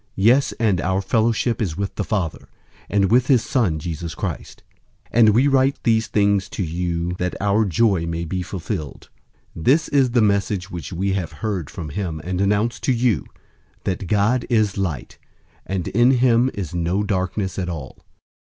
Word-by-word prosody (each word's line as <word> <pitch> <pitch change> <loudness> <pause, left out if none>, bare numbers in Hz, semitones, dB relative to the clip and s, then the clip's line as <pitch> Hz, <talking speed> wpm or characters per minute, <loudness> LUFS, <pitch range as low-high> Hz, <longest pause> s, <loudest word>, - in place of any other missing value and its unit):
Yes, 120 +8 +4
and 105 -8 +1
our 95 +1 0
fellowship 115 +3 +1
is 90 -7 -2
with 100 0 -3
the 105 - -2
Father, 95 -7 -3 0.4
and 100 -2 +2
with 125 +1 +4
his 130 -5 +4
Son, 105 -12 +1
Jesus 80 +1 -5
Christ. - - -6 0.5
001:004 120 - +2
And 110 -2 +7
we 120 +7 +4
write 135 0 +3
these 110 -2 +2
things 100 -2 +1
to 100 - -3
you, 85 +1 -2
that 90 0 -2
our 105 +2 +2
joy 95 -2 +1
may 85 0 -3
be 90 +3 -3
fulfilled. 80 -6 -6 0.5
001:005 80 - -7
This 155 +6 +4
is 135 -3 +3
the 120 0 +2
message 100 -2 0
which 85 0 -6
we 95 +2 -1
have 90 -5 -3
heard 90 -2 -3
from 80 - -7
him 85 -1 -4
and 90 +1 -2
announce 105 +4 +1
to - - 0
you, 120 -3 +1 0.6
that 95 0 -3
God 110 +5 +1
is 110 -4 +2
light, 90 -10 -4 0.5
and 95 -3 -2
in 120 +4 +4
him 125 -1 +4
is 90 -4 -5
no 90 +4 0
darkness 95 -1 -2
at 90 -1 -2
all. 75 -7 -7
100 Hz, 180 wpm, -21 LUFS, 90-115 Hz, 0.6 s, And